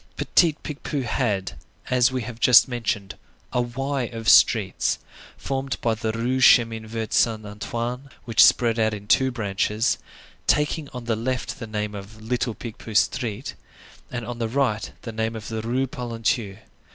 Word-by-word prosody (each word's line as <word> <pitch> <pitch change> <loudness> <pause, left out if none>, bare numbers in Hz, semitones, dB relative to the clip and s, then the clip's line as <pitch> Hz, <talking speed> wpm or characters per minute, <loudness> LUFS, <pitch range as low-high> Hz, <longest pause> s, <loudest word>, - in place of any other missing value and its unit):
Petit 170 -3 +3
Picpus 145 -2 -4
had, 105 -5 -1 0.4
as 125 0 +4
we 130 -2 -2
have 115 0 -8
just 125 +1 +7
mentioned, 110 -6 -3 0.4
a 125 - +2
Y 135 +2 -2
of 115 -1 -7
streets, 105 -6 +4 0.4
formed 135 0 -3
by 115 - +1
the 110 0 -2
Rue 120 +3 -1
du - - -1
Chemin 115 -3 +5
Vert 110 -1 -4
Saint 110 -2 +2
Antoine, 120 +5 -5 0.2
which 115 -2 +5
spread 115 -1 +4
out 110 -1 +2
in 100 -1 -10
two 130 +5 +3
branches, 105 0 0 0.5
taking 150 0 +1
on 125 -2 -8
the 115 -1 0
left 125 +3 -3
the 115 - -6
name 105 -1 -3
of 100 +2 -9
Little 115 0 -2
Picpus 110 -2 0
Street, 115 +1 -4 0.6
and 120 -2 -5
on 120 0 -6
the 115 -1 -1
right 125 -4 0
the 115 - -5
name 110 +1 -2
of 110 -2 -7
the 110 -1 -3
Rue 125 +4 0
Polonceau. 115 -5 -2
115 Hz, 165 wpm, -24 LUFS, 110-125 Hz, 0.6 s, just